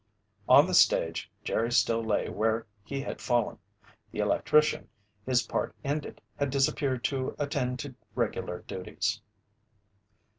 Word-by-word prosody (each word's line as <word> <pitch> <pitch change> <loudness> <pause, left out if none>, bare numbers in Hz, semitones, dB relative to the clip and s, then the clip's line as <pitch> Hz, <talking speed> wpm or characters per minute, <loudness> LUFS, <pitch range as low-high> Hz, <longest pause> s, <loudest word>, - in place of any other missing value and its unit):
On - - +8
the - - -3
stage, 80 0 +3
Jerry 115 +1 0
still 115 -1 +3
lay 110 -2 0
where 110 +1 0 0.2
he 135 +5 -4
had - - -6
fallen. 120 -3 0 0.5
The - - -9
electrician, 150 0 +2 0.4
his 125 -1 +3
part - - -2
ended, 145 +1 -3 0.2
had 145 -1 0
disappeared 135 -1 +1
to 130 -2 -1
attend 135 -3 -1
to 140 -2 -7 0.2
regular 110 -6 -2
duties. 100 +3 -3
125 Hz, 125 wpm, -29 LUFS, 110-140 Hz, 0.5 s, On